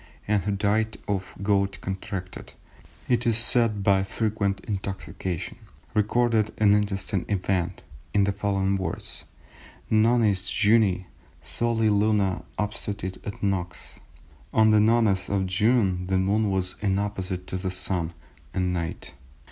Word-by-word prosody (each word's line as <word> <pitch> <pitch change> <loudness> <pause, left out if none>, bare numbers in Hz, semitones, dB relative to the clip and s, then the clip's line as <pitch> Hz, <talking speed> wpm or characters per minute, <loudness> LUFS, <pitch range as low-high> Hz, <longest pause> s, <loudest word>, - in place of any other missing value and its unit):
and 105 -3 +1
who 105 - 0
died 105 +2 +1
of 95 -2 -3
gout 100 -1 +1
contracted, 95 -1 -6 0.5
it 120 -1 +2
is 115 -2 +4
said, 115 -3 +3
by 95 -1 +4
frequent 100 -1 -1
intoxication, 95 -4 -4 0.3
recorded 110 0 +2
an 105 -2 +5
interesting 100 -2 0
event 90 -3 -1 0.3
in 100 - +3
the 100 - +2
following 100 -1 0
words:—Nonis 105 - -1
Junii 105 -3 +3 0.4
soli 115 -2 +1
luna 105 -2 +2 0.2
obstetit 105 -3 -3
et 100 - -7
nox, 95 -3 -2 0.5
"On 110 0 +5
the 110 - +6
Nones 110 -3 +3
of 100 -1 +1
June 95 -2 +2
the 95 0 +1
Moon 100 +3 +2
was 95 -1 -1
in 100 -2 +1
opposition 95 -3 -3
to 95 - -4
the 95 0 -3
Sun 90 -2 -1 0.4
and 90 -1 +1
night." 85 -2 -3
100 Hz, 125 wpm, -26 LUFS, 95-110 Hz, 0.5 s, the